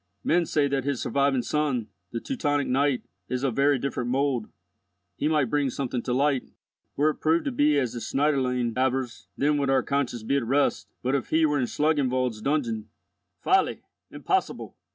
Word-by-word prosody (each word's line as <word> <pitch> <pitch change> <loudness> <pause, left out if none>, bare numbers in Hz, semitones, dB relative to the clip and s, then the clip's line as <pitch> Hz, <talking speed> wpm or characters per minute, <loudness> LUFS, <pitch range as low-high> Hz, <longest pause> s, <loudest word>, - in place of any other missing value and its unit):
Men 170 0 +2
say 145 -2 +2
that 135 -2 -1
his 140 -2 -1
surviving 140 -2 +1
son, 140 -7 -1 0.2
the 115 - -3
Teutonic 145 - -1
knight, 135 0 +1 0.3
is 125 +1 -2
of 130 -5 0
very 140 0 +3
different 125 -2 -3
mould. 130 -3 0 0.7
He 150 - -1
might 150 -6 +1
bring 145 -2 +1
something 125 -2 -3
to 125 - -4
light. 135 +1 +1 0.5
Were 150 +2 +3
it - - -13
proved 160 +2 +2
to 280 - 0
be 150 - +3
as 130 -5 0
the 120 - -4
Schneiderlein 125 -3 0
avers, 130 -1 -1
then 145 +1 +2
would 140 -1 0
our 135 -2 +3
conscience 130 -5 -1
be 140 +5 +1
at 135 - 0
rest; 135 +5 +1 0.2
but, 130 +2 0
if 140 -3 -1
he 160 0 +3
were 145 -1 +1
in 125 - 0
Schlangenwald's 130 -7 0
dungeon—" 120 -6 -1 0.5
"Folly! - - +2 0.3
Impossible!" - - -2
140 Hz, 180 wpm, -26 LUFS, 125-145 Hz, 0.7 s, very